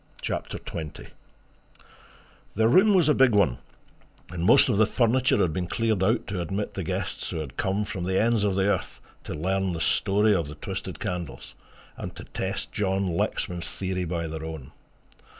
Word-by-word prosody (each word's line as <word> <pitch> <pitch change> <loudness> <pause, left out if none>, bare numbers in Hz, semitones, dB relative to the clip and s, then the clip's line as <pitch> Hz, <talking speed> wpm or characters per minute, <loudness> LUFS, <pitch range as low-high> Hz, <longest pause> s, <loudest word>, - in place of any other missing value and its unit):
CHAPTER - - -3
XX 80 -2 -7 1.5
The 110 +2 +3
room 195 - +5
was 175 -5 +4
a 150 - +5
big 130 -4 +4
one 100 -12 +3 0.7
and 85 -2 -4
most - - +7
of 120 -6 +1
the 110 0 +5
furniture 125 +2 +2
had 85 -4 +1
been 90 +1 -2
cleared 110 -1 0
out 110 +5 +2
to 95 -2 -3
admit 95 +5 -3
the 95 - -4
guests - - -2
who - - -4
had 75 -5 -6
come 100 +2 0
from 90 -3 -4
the 95 +1 +1
ends 115 -1 +2
of 100 -2 +1
the 95 0 +2
earth 100 -3 -1 0.3
to - - -5
learn 95 +3 0
the 85 - -4
story 105 +5 +3
of 85 -6 0
the 75 - -8
twisted 75 - -6
candles, 85 -6 -5 0.4
and - - -6
to - - -8
test - - -4
John 95 -3 0
Lexman's 85 0 -2
theory 95 -1 -3
by 85 0 -2
their 80 0 -5
own. 80 -3 -7
95 Hz, 185 wpm, -26 LUFS, 85-105 Hz, 1.5 s, most